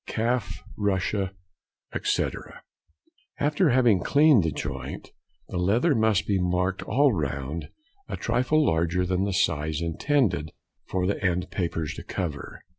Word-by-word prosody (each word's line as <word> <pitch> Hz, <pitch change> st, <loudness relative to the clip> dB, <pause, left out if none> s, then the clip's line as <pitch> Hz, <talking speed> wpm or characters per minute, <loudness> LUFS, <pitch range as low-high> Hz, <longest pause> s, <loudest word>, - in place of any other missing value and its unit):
Calf, 120 Hz, +1 st, -1 dB
Russia, 95 Hz, -1 st, 0 dB, 0.6 s
etc.—After 145 Hz, -, -3 dB
having 120 Hz, -6 st, +4 dB
cleaned 145 Hz, -, +5 dB
the 80 Hz, -, 0 dB
joint, 65 Hz, -4 st, -6 dB, 0.4 s
the 90 Hz, -, -3 dB
leather 115 Hz, -, +3 dB
must 110 Hz, -3 st, +2 dB
be 100 Hz, -2 st, +1 dB
marked 90 Hz, +1 st, 0 dB
all 135 Hz, +4 st, +3 dB
round 70 Hz, -1 st, -3 dB, 0.4 s
a -, -, -3 dB
trifle 150 Hz, +5 st, +1 dB
larger 85 Hz, -, +1 dB
than 95 Hz, +1 st, 0 dB
the 100 Hz, -, -1 dB
size 80 Hz, -3 st, 0 dB
intended 85 Hz, -, 0 dB, 0.3 s
for 90 Hz, -1 st, -1 dB
the 100 Hz, +1 st, -1 dB
end 90 Hz, -1 st, 0 dB
papers 85 Hz, -4 st, -2 dB
to -, -, -8 dB
cover. 75 Hz, -6 st, -5 dB
95 Hz, 125 wpm, -26 LUFS, 85-115 Hz, 0.6 s, cleaned